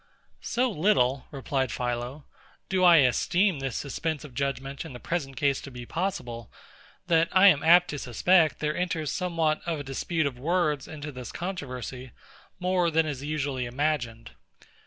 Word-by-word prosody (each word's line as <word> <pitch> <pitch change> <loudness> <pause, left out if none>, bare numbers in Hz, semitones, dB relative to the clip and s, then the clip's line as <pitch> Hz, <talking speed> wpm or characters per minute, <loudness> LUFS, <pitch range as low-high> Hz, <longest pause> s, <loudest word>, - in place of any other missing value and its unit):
So 250 +1 0
little, 150 -8 +2
replied 135 -2 -2
PHILO, 125 +4 -3 0.5
do 185 -1 +1
I 175 -2 +8
esteem 175 - +2
this 135 -3 -3
suspense 155 +2 -3
of 145 -4 -11
judgement 135 +1 -3
in - - -9
the 125 - -8
present 140 -4 -3
case 140 -1 +1
to - - -9
be 125 -2 -9
possible, 120 - -4 0.5
that 165 -1 +3
I 190 +2 +7
am 150 -6 +3
apt 175 +2 +6
to 145 - -4
suspect 160 +7 +3
there 150 0 0
enters 165 -4 -1
somewhat 165 -4 0
of 165 -3 -1
a - - -7
dispute 155 +4 -1
of 130 -3 -3
words 155 -2 0
into 150 -1 -7
this 125 -3 -8
controversy, 130 - -6 0.5
more 180 -1 +1
than 160 0 +2
is 145 -4 -4
usually 145 -4 -2
imagined. 125 -4 -2
150 Hz, 160 wpm, -27 LUFS, 130-170 Hz, 0.5 s, I